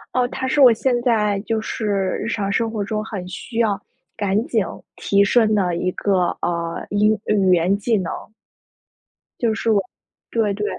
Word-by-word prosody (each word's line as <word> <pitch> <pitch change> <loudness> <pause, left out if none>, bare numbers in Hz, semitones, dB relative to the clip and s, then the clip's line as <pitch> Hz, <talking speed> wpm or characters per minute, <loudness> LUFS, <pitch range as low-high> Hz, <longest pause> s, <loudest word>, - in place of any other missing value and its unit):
哦， 250 - +3
它 260 +1 -3
是 285 +2 +2
我 255 -3 +9
现 240 +2 +1
在 215 -4 +2
就 220 +1 -1
是 220 0 -4 0.4
日 225 - -3
常 200 -3 -1
生 225 +2 0
活 215 -2 -3
中 215 +1 -2
很 195 -5 -6
需 225 +6 -6
要， 205 -4 +2 0.4
赶紧 205 +1 0 0.3
提 200 0 +2
升 215 +1 +3
的 180 -4 +1
一 180 +2 -1
个， 185 -2 +1
呃， 170 -1 -2
英 210 +1 +2
语 195 -3 +2
言 180 +4 +2
技 220 +2 +1
能。 185 -4 -3 1.3
就 230 -2 +1
是 225 - -2
我 200 -2 +3 0.5
对， 215 -3 +1
对， 210 +1 -3
210 Hz, 190 characters per minute, -21 LUFS, 195-225 Hz, 1.3 s, 我